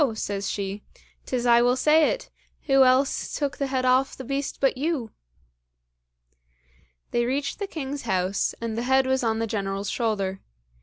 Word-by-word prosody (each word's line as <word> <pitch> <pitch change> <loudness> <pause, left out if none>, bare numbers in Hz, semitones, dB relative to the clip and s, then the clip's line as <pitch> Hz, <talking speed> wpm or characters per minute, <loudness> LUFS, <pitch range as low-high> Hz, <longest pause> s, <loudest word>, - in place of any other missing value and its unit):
says 200 -2 -3
she, 200 0 -4 0.5
"'tis 250 -2 -1
I 235 0 +6
will 245 +1 +3
say 305 +4 +4
it; - - -4 0.3
who 270 -2 +5
else 260 +2 +2
took 285 -2 -2
the 280 - -1
head 260 -1 -1
off 255 +1 +2
the 265 - -7
beast 275 +2 -3
but 270 - +2
you!" 275 -4 -2 2.0
They 240 - +1
reached 275 +7 -2
the 405 - -3
king's 285 -5 -5
house, 190 -2 0
and 230 -1 -3
the 230 - -2
head 265 0 +4
was 260 0 +1
on 225 -1 +1
the 225 - 0
General's 200 -2 -3
shoulder. 200 -5 -1
255 Hz, 165 wpm, -25 LUFS, 220-275 Hz, 2.0 s, I